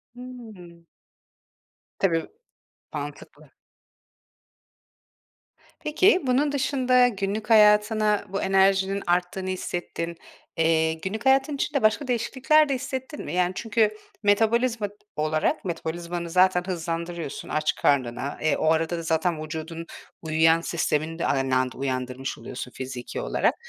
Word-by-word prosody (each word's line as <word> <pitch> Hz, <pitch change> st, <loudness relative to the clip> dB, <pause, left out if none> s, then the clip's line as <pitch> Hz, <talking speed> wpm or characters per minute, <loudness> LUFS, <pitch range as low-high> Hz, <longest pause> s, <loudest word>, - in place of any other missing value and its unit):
Hımm. 220 Hz, -9 st, -11 dB, 1.1 s
Tabii, 165 Hz, -4 st, +1 dB, 0.6 s
mantıklı. -, -, -8 dB, 2.3 s
Peki, 360 Hz, +6 st, +4 dB
bunun 275 Hz, +4 st, +2 dB
dışında 255 Hz, -3 st, +3 dB
günlük 205 Hz, 0 st, -3 dB
hayatına 210 Hz, -1 st, +4 dB
bu 195 Hz, +1 st, -2 dB
enerjinin 195 Hz, 0 st, +2 dB
arttığını 180 Hz, +2 st, 0 dB
hissettin, 175 Hz, -2 st, -4 dB, 0.4 s
eee, 160 Hz, 0 st, +3 dB
günlük 190 Hz, +8 st, -5 dB
hayatın 270 Hz, +2 st, +3 dB
içinde 280 Hz, 0 st, -1 dB
başka 215 Hz, +6 st, +2 dB
değişiklikler 265 Hz, +5 st, +2 dB
de 275 Hz, -, +1 dB
hissettin 260 Hz, +3 st, -5 dB
mi? -, -, -5 dB
Yani, 180 Hz, 0 st, +2 dB
çünkü 215 Hz, 0 st, +1 dB, 0.3 s
metabolizma 225 Hz, +2 st, +2 dB
t 200 Hz, -, -17 dB, 0.2 s
olarak 155 Hz, +3 st, 0 dB
metabolizmanı 170 Hz, 0 st, -4 dB
zaten 180 Hz, +1 st, +3 dB
hızlandırıyorsun 170 Hz, -3 st, -4 dB
aç 155 Hz, 0 st, 0 dB
karnına, 130 Hz, 0 st, 0 dB
eee, 155 Hz, -1 st, +2 dB
o -, -, -1 dB
arada 165 Hz, +1 st, 0 dB
da -, -, -4 dB
zaten 165 Hz, 0 st, 0 dB
vücudun 160 Hz, +2 st, -6 dB, 0.4 s
uyuyan 160 Hz, +1 st, +3 dB
sistemini 165 Hz, -1 st, -1 dB
de -, -, 0 dB
aynı 135 Hz, -1 st, +1 dB
anda 130 Hz, 0 st, 0 dB
uyandırmış 130 Hz, 0 st, -3 dB
oluyorsun 125 Hz, 0 st, -7 dB
fiziki 130 Hz, -, -6 dB
olarak. -, -, +1 dB
180 Hz, 115 wpm, -25 LUFS, 160-225 Hz, 2.3 s, Peki